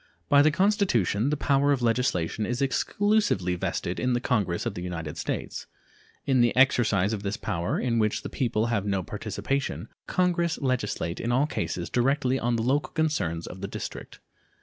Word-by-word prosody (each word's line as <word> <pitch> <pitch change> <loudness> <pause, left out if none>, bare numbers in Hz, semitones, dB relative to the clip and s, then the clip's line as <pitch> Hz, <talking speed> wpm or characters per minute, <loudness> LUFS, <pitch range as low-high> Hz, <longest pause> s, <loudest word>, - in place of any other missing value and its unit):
By 140 0 +7
the 150 - +5
Constitution 155 - +2
the 150 - 0
power 140 0 +2
of 135 -3 +1
legislation 115 -5 0
is 120 +3 -2
exclusively 170 - +1
vested 90 0 -2
in 125 -1 +1
the 120 - +1
Congress 105 -9 0
of - - -2
the 90 - -6
United 85 -3 -5
States. 80 - -4 0.6
In 130 -3 +3
the 120 -1 +3
exercise 110 -6 +3
of 105 - -3
this 100 +1 -3
power, 90 -7 -2
in 115 -2 0
which 110 -1 0
the - - -4
people 115 -4 0
have 105 -3 +1
no 100 -2 -1
participation, 135 +9 -3 0.2
Congress 175 -2 +1
legislate 120 - -1
in 120 - -1
all 130 +4 +3
cases 85 - -3
directly 130 +1 +1
on 120 0 0
the 115 - -1
local 140 +5 0
concerns 100 - -1
of 95 - -9
the 100 - -3
District. - - -7
120 Hz, 175 wpm, -27 LUFS, 100-140 Hz, 0.6 s, By